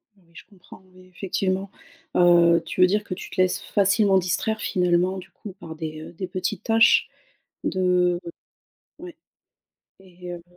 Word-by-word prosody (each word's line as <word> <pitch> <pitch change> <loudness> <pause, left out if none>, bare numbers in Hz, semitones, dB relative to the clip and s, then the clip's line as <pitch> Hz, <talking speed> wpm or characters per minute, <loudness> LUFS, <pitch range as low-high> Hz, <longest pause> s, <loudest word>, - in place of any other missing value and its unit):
Oui, 195 - -28
je - - -13
comprends 190 -2 -16
oui, 185 0 -18
effectivement. 190 0 -2 0.5
Heu, 170 -1 +5
tu - - -3
veux 180 - +7
dire 210 +2 0
que 185 - -6
tu 180 - -9
te 185 - -8
laisses 185 -1 +1
facilement 200 0 +2
distraire 185 +5 -1
finalement 180 +1 +1
du 190 +1 -10
coup 195 0 -11
par 160 -2 -9
des, 155 -1 -6
heu, 160 - -10
des 185 +2 -6
petites 185 0 -4
tâches 225 0 +4 0.6
de 180 -1 +1 0.8
ouais 350 -3 -11 0.8
et 180 -1 -11
heu 175 -1 -8
185 Hz, 160 wpm, -23 LUFS, 175-195 Hz, 0.8 s, veux